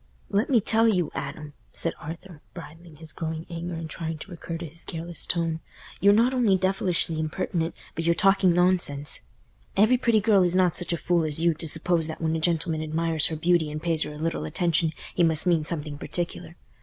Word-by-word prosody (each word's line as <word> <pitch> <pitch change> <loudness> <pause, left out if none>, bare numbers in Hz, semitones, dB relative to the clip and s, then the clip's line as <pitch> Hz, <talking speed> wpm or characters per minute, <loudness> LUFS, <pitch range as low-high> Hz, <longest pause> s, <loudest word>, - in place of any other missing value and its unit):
"Let 205 +4 +1
me 250 -4 +5
tell 225 +2 +3
you, 180 -8 +1
Adam," 145 +1 -6 0.2
said 165 - -1
Arthur, 165 0 -9
bridling 165 -1 -11
his 160 0 -9
growing 160 0 -4
anger 170 +1 -5
and 165 0 -5
trying 160 -1 -4
to 185 +5 -10
recur 170 -1 -6
to 170 - -6
his 165 +2 -8
careless 170 0 -6
tone, 165 -2 -1 0.4
"you're 200 - +6
not 230 +5 +3
only 230 -7 +3
devilishly 185 -3 0
impertinent, 160 +2 -2 0.2
but 165 - -3
you're 170 +1 +2
talking 195 +1 +4
nonsense. 170 - +2 0.5
Every 220 +5 +5
pretty 235 -3 +3
girl 205 -2 +4
is 180 0 +2
not 180 -2 +3
such 175 -2 0
a 170 - 0
fool 170 0 +1
as 155 +1 0
you, 170 -1 +4
to 160 +1 -4
suppose 165 +1 +1
that 160 - -6
when 160 -1 0
a - - -1
gentleman 165 -1 0
admires 160 0 0
her 160 - -4
beauty 170 0 +2
and 150 0 -5
pays 165 -1 0
her - - -1
a 150 - -9
little 160 - -2
attention, 165 - 0 0.2
he - - 0
must 160 -1 +5
mean 170 -3 +2
something 150 -2 -3
particular. 175 0 -4
170 Hz, 205 wpm, -26 LUFS, 160-180 Hz, 0.5 s, you're